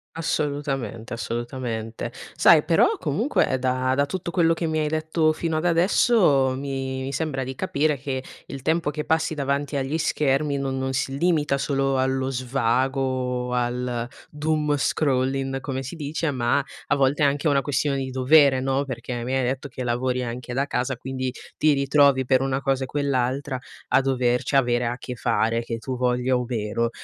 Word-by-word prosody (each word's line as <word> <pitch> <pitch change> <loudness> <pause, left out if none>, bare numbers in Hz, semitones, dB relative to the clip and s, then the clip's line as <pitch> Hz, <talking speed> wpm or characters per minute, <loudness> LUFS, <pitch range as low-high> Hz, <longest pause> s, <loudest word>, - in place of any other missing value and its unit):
Assolutamente, 140 -7 -2
assolutamente. 115 0 -4 0.2
Sai 160 -3 +6
però, 165 0 +3
comunque, 185 - +1
ehm, 130 - 0
da 130 0 0
da 140 +1 +2
tutto 175 -1 -4
quello 165 -2 +3
che 165 - -3
mi 155 0 0
hai 150 - 0
detto 155 +1 +1
fino 160 0 -2
ad 160 - -2
adesso, 170 - +3
mi 135 -1 -3
mi 135 +1 -4
sembra 135 -2 -2
di 130 +1 -5
capire 145 +3 0
che 130 -1 -3 0.2
il 135 -1 -8
tempo 160 0 +1
che 150 0 -4
passi 160 0 +1
davanti 140 0 -1
agli 140 +3 -1
schermi 145 -1 +1
no 135 -1 -2
non 130 0 -2
si 135 +1 -1
limita 150 -4 +2
solo 135 -1 0
allo 130 0 0
svago 130 +1 0
o 125 -1 -1
al 120 -1 -1 0.2
doom 150 0 0
scrolling 135 -1 0
come 135 0 -4
si 140 +7 -7
dice 150 0 -2
ma 130 +2 +1 0.2
a - - +2
volte 140 +2 +2
è - - +6
anche 140 +2 0
una 140 -1 +3
questione 140 0 0
di 135 -1 -3
dovere, 130 +1 +4
no, 135 +1 0
perché 120 -1 -5
mi 130 +2 -1
hai 130 - +1
detto 130 +3 -2
che 130 0 -6
lavori 125 +1 0
anche 120 +1 -5
da 140 +1 +1
casa, 130 -2 -2
quindi 130 0 -3 0.3
ti 155 -1 +4
ritrovi 140 -1 +3
per 130 0 +3
una 135 0 -1
cosa 135 -1 0
e - - -12
quell'altra 135 -1 -1 0.3
a 135 - +4
doverci 125 0 0
avere 120 -2 +2
a 120 +1 -2
che 125 0 -7
fare, 115 0 +1
che 115 -1 -4
tu 130 +3 -5
voglia 125 +1 +1
o 125 0 0
meno. 115 0 -1
135 Hz, 180 wpm, -24 LUFS, 125-145 Hz, 0.3 s, Sai